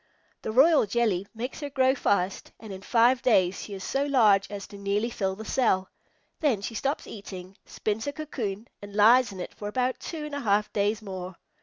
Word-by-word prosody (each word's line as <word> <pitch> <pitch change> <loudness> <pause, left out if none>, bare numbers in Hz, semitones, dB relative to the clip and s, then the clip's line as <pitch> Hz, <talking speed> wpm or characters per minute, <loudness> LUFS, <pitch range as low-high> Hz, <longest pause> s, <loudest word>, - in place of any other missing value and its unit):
The - - -4
royal 275 +1 +5
jelly 200 -4 0
makes 245 +4 -5
her 290 -2 -4
grow 265 -1 +3
fast, 200 -7 -1
and 215 -3 -9
in 190 - -8
five 240 +4 +3
days 190 -7 +2
she 205 - -7
is 190 - -7
so 275 +7 0
large 220 -9 +4
as 200 -1 -6
to 200 - -10
nearly 205 +4 -1
fill 190 -3 -2
the 220 +2 -9
cell. 190 -7 +1 0.5
Then 280 - +2
she 215 - -5
stops 275 +6 -2
eating, 190 -2 -9
spins 215 +4 -3
a - - 0
cocoon, 240 -8 -5
and 205 0 -10
lies 235 +4 +6
in 190 - -9
it 180 - -6
for 205 - -7
about 250 +4 -1
two 315 -3 -6
and 300 - -8
a 285 - -2
half 210 -4 +1
days 210 +2 0
more. 185 -2 -6
215 Hz, 205 wpm, -27 LUFS, 200-255 Hz, 0.5 s, lies